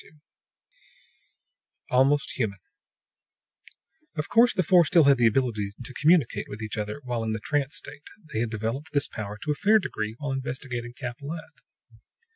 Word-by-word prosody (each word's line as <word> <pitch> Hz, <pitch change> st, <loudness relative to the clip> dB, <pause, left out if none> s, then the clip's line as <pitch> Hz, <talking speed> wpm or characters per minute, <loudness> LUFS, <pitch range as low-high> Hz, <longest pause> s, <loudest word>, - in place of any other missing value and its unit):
II -, -, -18 dB, 1.8 s
ALMOST 135 Hz, +3 st, +3 dB
HUMAN 105 Hz, -5 st, 0 dB, 1.6 s
Of 150 Hz, -1 st, -3 dB
course, 235 Hz, +1 st, +6 dB
the 185 Hz, -, +1 dB
four 175 Hz, +1 st, +6 dB
still 170 Hz, 0 st, +5 dB
had 140 Hz, -2 st, +5 dB
the 120 Hz, -, +6 dB
ability 110 Hz, -4 st, 0 dB
to 130 Hz, -, -9 dB
communicate 155 Hz, -2 st, +2 dB
with 105 Hz, -, -7 dB
each 110 Hz, -, -4 dB
other 105 Hz, +6 st, -4 dB
while 120 Hz, -2 st, -2 dB
in 110 Hz, -1 st, -1 dB
the 110 Hz, -, -3 dB
trance 145 Hz, +3 st, -1 dB
state; 150 Hz, 0 st, -9 dB, 0.3 s
they 110 Hz, -, 0 dB
had 120 Hz, 0 st, 0 dB
developed 115 Hz, +7 st, -4 dB
this 145 Hz, -1 st, +2 dB
power 105 Hz, -2 st, -6 dB
to 150 Hz, -, -1 dB
a -, -, +3 dB
fair 210 Hz, +8 st, +4 dB
degree 110 Hz, -, -3 dB
while 145 Hz, 0 st, -4 dB
investigating 125 Hz, -2 st, -4 dB
Capellette. 140 Hz, +6 st, -7 dB
130 Hz, 160 wpm, -26 LUFS, 110-150 Hz, 1.8 s, course